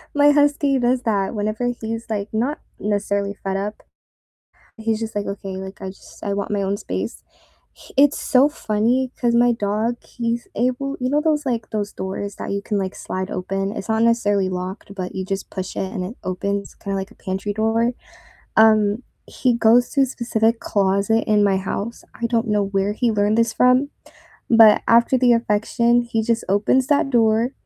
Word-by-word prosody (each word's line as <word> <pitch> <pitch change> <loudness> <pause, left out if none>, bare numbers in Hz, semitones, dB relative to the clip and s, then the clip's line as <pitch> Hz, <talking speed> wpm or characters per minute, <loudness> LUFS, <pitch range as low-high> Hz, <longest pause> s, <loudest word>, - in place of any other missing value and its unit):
my 290 0 +6
Husky 290 -1 +3
does 245 +1 +1
that 200 -4 0
whenever 215 +4 -1
he's, 225 +1 -4
like, 210 -1 -2
not 255 +8 -1 0.2
necessarily 200 -1 -1
fed 195 0 -1
up, 205 +2 -5 0.9
he's 220 0 -1
just 220 -1 -5
like, 205 - -1
"Okay, 195 -1 -5
like, 190 +1 -8
I 190 - -5
just 190 - -14
I 200 - -1
want 200 +1 -3
my 205 -1 0
own 195 +1 -1
space," - - -5 0.5
h - - -16
it's 285 +1 +4
so 265 +2 +4
funny 245 -1 0
'cause 240 -2 +2
my 240 0 +4
dog, 215 +2 -1
he's 235 0 -3
able 255 +4 -1
you 255 0 -1
know 295 +1 +2
those, 305 -2 +1
like 230 -3 -2
those 205 -1 -3
doors 195 +2 -5
that - - -6
you 200 0 -2
can, 205 0 -2
like, 190 -1 -2
slide 185 0 -5
open? 195 +2 -2
It's 195 - -6
not 220 +1 +2
necessarily 205 -5 +2
locked, 185 +2 -6
but 185 -2 -5
you 190 - -3
just 195 0 -4
push 190 -1 -6
it 190 - -3
and 185 - -3
it 220 +7 -7
opens 200 +2 -3
kinda 195 -1 -4
like 195 +2 -5
a - - -17
pantry 190 +1 -4
door, 225 +3 +1 0.6
um, 215 +1 +4 0.2
he 250 -3 0
goes 235 +2 +4
to 280 - 0
a - - +3
specific 230 -2 0
closet 200 +3 +1
in 210 -1 +4
my 195 -1 +3
house, 200 +4 -4 0.2
I 235 - +1
don't 230 0 0
know 210 -1 +2
where 195 +1 0
he 230 +1 0
learned 210 +1 +1
this 230 -1 +2
from, 255 +3 +3 0.6
but 225 -2 +7
after 235 +3 +5
the 245 -1 +4
affection, 235 +1 +2
he 230 -2 -2
just 230 -1 0
opens 215 +7 +2
that 290 -2 +2
door 230 +1 +2
220 Hz, 190 wpm, -21 LUFS, 200-240 Hz, 0.9 s, but